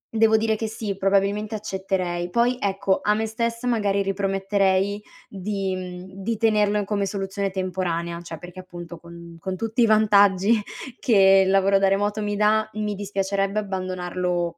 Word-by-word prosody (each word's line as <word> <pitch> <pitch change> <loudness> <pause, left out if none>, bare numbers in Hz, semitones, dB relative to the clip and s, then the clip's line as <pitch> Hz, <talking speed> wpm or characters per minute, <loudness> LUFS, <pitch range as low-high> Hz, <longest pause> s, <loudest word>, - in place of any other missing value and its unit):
devo 220 0 +5
dire 220 0 +1
che, 220 +1 -3
sì, 215 -2 -4
probabilmente 200 +2 +1
accetterei. 190 -4 -3
Poi, 240 +5 +1
ecco, 195 -1 0
a 210 - +3
me 220 +1 -1
stessa 230 +2 -3
magari 205 -4 +1
riprometterei 195 0 0 0.3
di 195 -1 -3
mhmm, 185 +1 -8
di 225 0 -1
tenerlo 210 -2 +2
in 200 - -2
come 200 -1 -1
soluzione 195 0 -3
temporanea, 175 -3 -3
cioè 165 -2 -8
perché, 180 +1 -11
appunto, 175 -2 -10
con 170 0 -12
con 190 +1 -4
tutti 225 +4 -2
i - - +6
vantaggi 210 -1 +4 0.4
che 195 -4 +5
il 190 - +1
lavoro 195 0 +4
da 195 - +3
remoto 205 +2 0
mi 205 0 -2
dà, 215 +1 +2
mi 210 -1 -2
dispiacerebbe 195 0 -1
abbandonarlo 180 -3 -3
195 Hz, 160 wpm, -23 LUFS, 185-210 Hz, 0.4 s, i